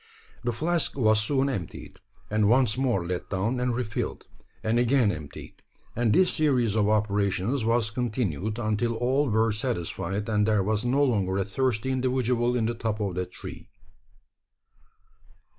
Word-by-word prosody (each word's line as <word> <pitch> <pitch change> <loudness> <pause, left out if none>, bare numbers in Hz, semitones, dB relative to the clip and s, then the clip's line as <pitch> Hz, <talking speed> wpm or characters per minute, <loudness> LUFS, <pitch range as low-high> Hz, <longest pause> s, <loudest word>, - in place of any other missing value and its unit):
The 120 - 0
flask 165 +5 0
was 110 -4 +4
soon 135 +4 +1
emptied; 100 - -6 0.3
and 105 -1 +3
once 120 -2 +3
more 125 -9 0
let 90 0 -4
down 105 +7 -1
and 125 -1 0
re 125 - 0
filled, 105 -2 -4 0.4
and 115 +2 +1
again 120 -3 +3
emptied; 75 -5 -9 0.3
and 115 -1 +1
this 185 - +4
series 130 -8 +2
of 105 -1 +2
operations 105 +3 0
was 115 -1 +1
continued, 110 - -2
until 115 +1 -1
all 130 +4 +1
were 110 +1 +2
satisfied, 105 -2 -3
and 105 -1 +1
there 105 -3 +2
was 105 +1 0
no 130 +4 +2
longer 100 -8 +1
a 100 - 0
thirsty 125 +3 -1
individual 125 -2 +1
in 115 -2 +1
the 115 - 0
top 110 -2 -3
of 100 -3 -2
that 90 +1 -4
tree. - - -9
115 Hz, 160 wpm, -26 LUFS, 105-125 Hz, 0.4 s, was